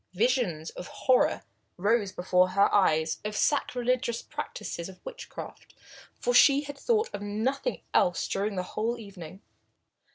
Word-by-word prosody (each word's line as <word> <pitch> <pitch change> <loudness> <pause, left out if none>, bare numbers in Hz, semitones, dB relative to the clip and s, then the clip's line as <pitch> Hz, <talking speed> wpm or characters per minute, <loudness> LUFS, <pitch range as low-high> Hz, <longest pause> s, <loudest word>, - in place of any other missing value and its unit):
Visions 210 - +1
of 180 - -8
horror 255 -2 +2 0.3
rose 205 +1 +1
before 180 0 +2
her 200 - +4
eyes 160 -5 +3
of 210 0 -5
the - - -4
sacrilegious 250 -4 0
practices 170 +2 -6
of 190 - -13
witchcraft, - - -9 0.4
for 245 - 0
she 280 +3 +7
had 285 -1 -7
thought 450 - +1
of 205 - -5
nothing 225 - -2
else 180 - +2
during 200 +1 -1
the 185 - -1
whole 230 +3 -1
evening. 195 -4 -10
215 Hz, 140 wpm, -28 LUFS, 185-255 Hz, 0.4 s, she